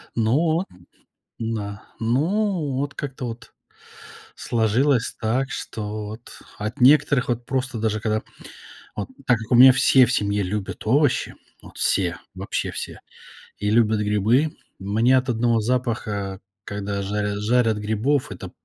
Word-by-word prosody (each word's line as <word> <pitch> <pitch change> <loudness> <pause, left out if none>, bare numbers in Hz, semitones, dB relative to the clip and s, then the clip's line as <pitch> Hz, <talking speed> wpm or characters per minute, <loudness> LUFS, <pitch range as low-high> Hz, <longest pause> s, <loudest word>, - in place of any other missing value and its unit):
Ну 115 0 +1
вот, 165 +3 +1 0.7
да. 105 -3 -4 0.2
Ну, 155 - 0
вот 140 +1 -2
как-то 135 -3 -5
вот 115 +1 -9 0.8
сложилось 120 +3 +1
так, 125 +5 0
что 105 -3 -5
вот 110 +3 -10 0.2
от 110 +6 -5
некоторых 135 -1 +5
вот 120 0 -2
просто 130 -3 -2
даже 110 -1 0
когда 110 -1 0 0.7
вот 105 - -4 0.2
так 120 -3 +4
как 110 +2 -9
у - - +5
меня 130 +2 +10
все 130 -1 +5
в 120 - -2
семье 100 -1 0
любят 100 +2 -4
овощи, 140 +3 +2 0.3
вот - - -14
все, 90 -3 +1 0.2
вообще 95 +1 -3
все, - - -7 0.6
и 105 0 -1
любят 110 -1 +3
грибы. 110 +9 +2 0.3
Мне 110 +6 +2
от 130 0 -1
одного 115 -1 +2
запаха, 105 -5 -2 0.2
когда 100 -1 -4
жаря 105 +1 -2
жарят 115 0 +2
грибов, 110 +7 0
это - - -8
115 Hz, 140 wpm, -23 LUFS, 105-130 Hz, 0.8 s, меня